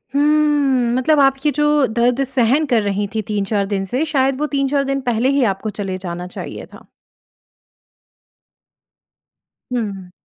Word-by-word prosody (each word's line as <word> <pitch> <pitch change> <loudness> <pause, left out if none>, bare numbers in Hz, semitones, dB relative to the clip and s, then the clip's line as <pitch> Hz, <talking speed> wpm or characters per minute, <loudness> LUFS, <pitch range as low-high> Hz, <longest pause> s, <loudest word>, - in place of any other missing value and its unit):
हुँ, 290 -4 +2
मतलब 290 +4 +2
आप 270 -1 +4
ये 295 - +4
जो 295 -1 +3
दर्द 240 +4 +1
सहन 260 +3 +2
कर 240 -6 +2
रही 205 0 -1
थीं 220 - 0
3-4 205 -1 -1
दिन 195 -1 -2
से 265 +5 +1
शायद 270 -3 0
वो 300 - 0
3-4 275 0 +1
दिन 275 0 -2
पहले 235 +4 +1
ही 270 - +3
आपको 195 +3 -6
चले 190 -2 -3
जाना 175 +1 -5
चाहिए 180 - -8
था। - - -14 2.9
हुँ। 200 -7 -4
255 Hz, 145 wpm, -19 LUFS, 205-280 Hz, 2.9 s, आप